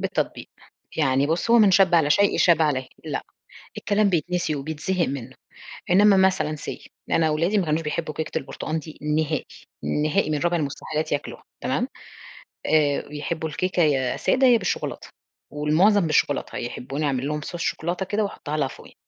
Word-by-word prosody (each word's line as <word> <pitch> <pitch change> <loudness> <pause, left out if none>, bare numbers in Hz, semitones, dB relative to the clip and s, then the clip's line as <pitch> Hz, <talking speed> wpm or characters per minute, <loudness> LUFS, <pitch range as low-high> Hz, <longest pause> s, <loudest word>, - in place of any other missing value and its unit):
بالتطبيق، - - -2 0.5
يعني 135 -2 +2
بُصّ، 165 +8 -1
هو 235 - +7
"من 210 -3 +6
شبّ 185 -1 +5
على 155 -3 +4
شيء 200 +6 +3
شاب 165 -2 +5
عليه"، 130 -4 0 0.2
لأ، - - -3 0.6
الكلام 205 0 +2
بيتنسي 175 -2 0
وبيتزهق 160 +5 -2
منه، 130 -2 -6 0.6
إنما 200 +1 +6
مثلًا 185 -5 +2
say - - -8 0.2
أنا 160 -1 +3
ولادي 170 +7 +1
ما 190 - +1
كانوش 155 +1 0
بيحبوا 155 0 -3
كيكة 155 +1 -3
البرتقان 155 +3 -4
دي 155 +1 -11
نهائي، 150 0 0 0.6
نهائي 155 +2 +1
من 150 - 0
رابع 175 +2 +1
المستحيلات 155 +1 -3
ياكلوها 145 - -4 0.2
تمام؟ - - 0 0.8
آآ، 145 -2 +2
بيحبوا 160 +2 -4
الكيكة 180 +3 0
يا 135 -5 +1
سادة 265 0 +2
يا 245 -2 +6
بالشوكولاتة، - - -3 0.4
والمعظم 165 +6 +3
بالشوكولاتة، 145 -2 0
يحبوني 135 +5 -4
أعمل 135 -1 -1
لهم 150 0 -2
صوص 170 +3 -7
شوكولاتة 175 +3 -2
كده 210 +2 0
وأحطها 155 -6 -4
لها 140 -3 0
فوقيها، - - -14
155 Hz, 160 wpm, -24 LUFS, 150-180 Hz, 0.8 s, هو